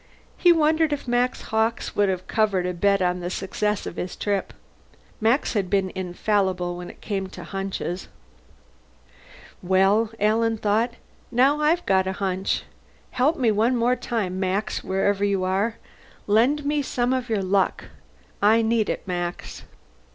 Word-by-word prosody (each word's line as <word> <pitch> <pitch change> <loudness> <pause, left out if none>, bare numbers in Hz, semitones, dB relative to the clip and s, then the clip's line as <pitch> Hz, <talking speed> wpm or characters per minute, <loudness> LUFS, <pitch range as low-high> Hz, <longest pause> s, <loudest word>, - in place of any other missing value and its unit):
He 350 - +5
wondered 315 -1 +3
if 285 - -5
Max 245 +1 0
Hawkes 220 +1 0
would 205 -1 +3
have 185 -1 -2
covered 205 -5 +1
a 180 - -1
bet 200 +2 +2
on 180 0 0
the 175 0 -4
success 205 +2 -2
of - - -7
his 180 - -4
trip. 200 -2 -2 0.7
Max 230 +6 +2
had 200 -5 -1
been 190 -1 +1
infallible 185 -1 -1
when 175 0 -7
it - - -14
came 195 -3 -3
to - - -10
hunches. 195 -2 -4 1.5
Well, 195 +4 +3
Alan 225 +2 +2
thought, 220 +3 0 0.4
_now 275 +5 +3
I've 330 +4 +2
got 190 -1 +2
a 190 - -1
hunch. 190 0 -1 0.5
Help 280 +7 +2
me 245 -5 +2
one 225 +4 +2
more 240 +2 +2
time, 200 -8 -3
Max, 195 +3 -1
wherever 195 +1 0
you 200 -2 +1
are! 195 +5 0 0.5
Lend 250 +8 +2
me 295 0 +1
some 250 -2 0
of 255 -2 -2
your 210 -3 0
luck. 190 0 +1 0.6
I 220 +3 +5
need 225 -1 +1
it, - - -4
Max. 175 -1 -4
205 Hz, 155 wpm, -24 LUFS, 190-235 Hz, 1.5 s, He